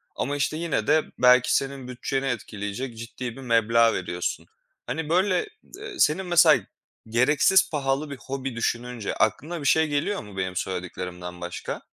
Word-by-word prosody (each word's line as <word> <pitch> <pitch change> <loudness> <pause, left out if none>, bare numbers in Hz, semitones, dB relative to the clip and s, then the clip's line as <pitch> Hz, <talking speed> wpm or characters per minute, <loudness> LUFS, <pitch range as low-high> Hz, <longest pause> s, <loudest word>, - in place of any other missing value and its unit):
Ama, 145 - -2
işte, 145 +2 -1
yine 165 -10 -1
de 155 +1 +4 0.2
belki 125 0 +5
senin 135 -2 -2
bütçeni 135 +2 -3
etkileyecek 115 -1 -4
ciddi 115 +1 -6
bir 135 - -10
meblağ 115 -1 +3
veriyorsun. 90 -1 -3 0.4
Hani, 160 -1 -3
böyle, 185 - +2 0.3
eee, 410 -1 -8
senin 160 +5 +3
mesela 160 - +5 0.5
gereksiz 150 +10 +4
pahalı 145 -1 -1
bir 140 - -6
hobi 135 0 -5
düşününce 115 -1 -2
aklına 150 +10 0
bir 145 - -6
şey 160 0 +4
geliyor 150 - -1
mu 100 -2 -12
benim 95 -1 -2
söylediklerimden 90 -1 -5
başka? 85 0 -5
130 Hz, 150 wpm, -25 LUFS, 110-150 Hz, 0.5 s, belki